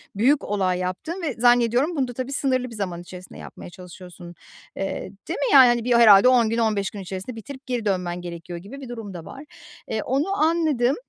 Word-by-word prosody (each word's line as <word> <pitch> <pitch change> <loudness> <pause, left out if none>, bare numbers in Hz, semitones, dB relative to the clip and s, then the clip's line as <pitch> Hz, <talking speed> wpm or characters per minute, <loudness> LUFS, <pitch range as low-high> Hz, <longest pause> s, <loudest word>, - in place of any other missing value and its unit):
büyük 265 +8 +2
olay 185 -3 -1
yaptığın 185 - -4
ve 305 -5 -2
zannediyorum 245 +6 +3
bunu 265 -3 0
da 245 - -7
tabii 255 +3 -5
sınırlı 255 -2 0
bir 230 - -10
zaman 180 -4 -4
içerisinde 180 +1 -12
yapmaya - - -10
çalışıyorsun. 180 -1 -12 0.4
Eee, 195 - -3 0.3
değil 340 - -4
mi - - 0
yani? 260 -2 +9
Hani, 240 -1 +1
bir 245 +1 +1
herhâlde 215 -2 +7
10 245 -3 +4
gün, 230 - -1
15 215 -4 0
gün 205 - -8
içerisinde 190 +5 -7
bitirip 265 +5 -10
geri 245 -4 -3
dönmen 180 -3 -2
gerekiyor 170 0 -8
gibi 265 +10 -11
bir 260 - -9
durum 225 -5 -7
da 165 -2 -9
var. 280 +3 -10 0.4
Eee, 220 - -2
onu 275 +6 0
anladım. 310 -6 +2
230 Hz, 205 wpm, -23 LUFS, 185-260 Hz, 0.4 s, yani